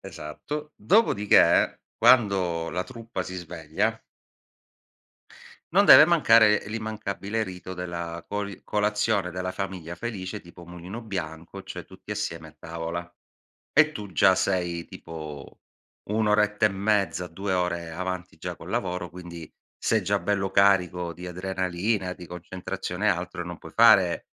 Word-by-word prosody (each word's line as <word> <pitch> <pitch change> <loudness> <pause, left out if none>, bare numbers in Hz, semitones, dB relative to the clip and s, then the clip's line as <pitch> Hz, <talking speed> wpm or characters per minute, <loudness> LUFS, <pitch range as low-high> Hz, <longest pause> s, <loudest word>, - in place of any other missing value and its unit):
Esatto. 150 - -7
Dopodiché 175 - +4 0.2
quando 95 -9 +3
la 90 +2 -2
truppa 115 -6 -6
si 95 - -7
sveglia 80 -3 -2 1.7
non 200 +3 +5
deve 150 - +10
mancare 115 -11 +5
l'immancabile 110 -1 -3
rito 95 -2 -7
della 85 -2 -5
coli 100 -2 -4
colazione 105 -2 0
della 90 0 -3
famiglia 90 -3 -5
felice 105 -1 -5
tipo 85 0 -14
Mulino 90 +6 -8
Bianco, 85 -6 -6
cioè - - -7
tutti - - -9
assieme 80 -1 -4
a 75 - -18
tavola. 85 +2 -6 0.6
E 155 0 +5
tu 105 -7 -8
già 95 +1 +5
sei 90 -3 -1
tipo 75 -4 -9 0.5
1 110 0 +1
oretta 105 0 +3
e - - +3
mezza, 95 -3 0
2 95 +4 -3
ore 85 -2 -1
avanti 90 0 -5
già 90 +2 -6
col - - -11
lavoro, 90 -4 -2
quindi 85 -1 -10 0.3
sei - - +1
già - - +1
bello 95 -2 -1
carico 90 -3 +3
di 90 +3 -9
adrenalina, 95 +2 -2
di 90 -1 -10
concentrazione 90 +2 -5
e - - +6
altro, 90 -1 -1
non 85 -1 -6
puoi - - -13
fare 95 -6 +5
95 Hz, 135 wpm, -26 LUFS, 85-105 Hz, 1.7 s, deve